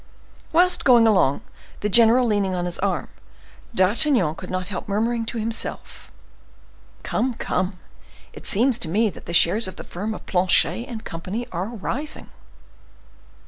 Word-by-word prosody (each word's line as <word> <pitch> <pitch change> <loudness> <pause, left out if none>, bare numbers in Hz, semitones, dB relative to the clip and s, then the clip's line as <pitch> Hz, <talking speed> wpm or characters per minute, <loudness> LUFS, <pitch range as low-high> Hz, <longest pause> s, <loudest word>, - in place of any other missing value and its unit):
Whilst 355 +2 +3
going 240 -3 +6
along, 185 -10 +2 0.4
the 210 - 0
general 235 +4 +6
leaning 205 -4 0
on 175 -1 -2
his 175 -1 -3
arm, 185 -7 -1 0.7
D'Artagnan 195 - +2
could 180 +2 -10
not 185 0 -3
help 185 -1 -6
murmuring 225 +3 -1
to 235 - -3
himself,—"Come, 230 +2 -6
come, 185 -3 -2 0.6
it - - -11
seems 235 +3 +1
to 160 - -3
me 210 +4 +1
that - - -14
the 170 - -5
shares 195 +6 +4
of 185 - -8
the - - -9
firm 210 +5 -5
of - - -11
Planchet 185 +5 +3
and 230 -4 -8
Company 190 +9 -5
are 180 +3 -3
rising." 240 +7 -5
210 Hz, 145 wpm, -22 LUFS, 185-235 Hz, 0.7 s, going